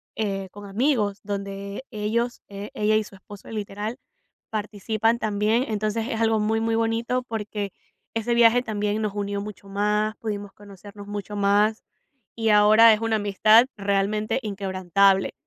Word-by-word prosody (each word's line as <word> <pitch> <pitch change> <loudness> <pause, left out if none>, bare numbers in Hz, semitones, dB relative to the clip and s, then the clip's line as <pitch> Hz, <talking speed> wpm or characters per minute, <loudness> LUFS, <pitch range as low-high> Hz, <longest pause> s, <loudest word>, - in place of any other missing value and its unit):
eh, 195 -3 -2
con 205 0 -11
amigos, 210 -1 0
donde 200 +2 -5
ellos, 235 +3 -2
eh, 200 +1 -8
ella 215 +1 +2
y 215 - +2
su 205 - -14
esposo, 200 +1 -13
literal, 210 +2 -5 0.5
participan 215 +2 -1
también, 215 +3 +1
entonces 215 +1 -2
es 225 - -2
algo 225 -1 +3
muy, 220 +1 +1
muy 225 0 0
bonito, 230 +2 0
porque 210 -3 -4 0.4
ese 225 +1 -1
viaje 235 +1 +5
también 210 -2 -2
nos 210 -2 -2
unió 200 0 -2
mucho 205 -1 -9
más, 210 +2 0
pudimos 205 -2 -5
conocernos 205 0 -12
mucho 205 0 -6
más, 205 +2 +2 0.5
y 225 -1 0
ahora 215 +2 +7
es 210 - 0
una 225 -1 +1
amistad 215 +3 +5
realmente 200 +3 0
inquebrantable. 195 -1 +1
210 Hz, 145 wpm, -24 LUFS, 200-225 Hz, 0.5 s, ahora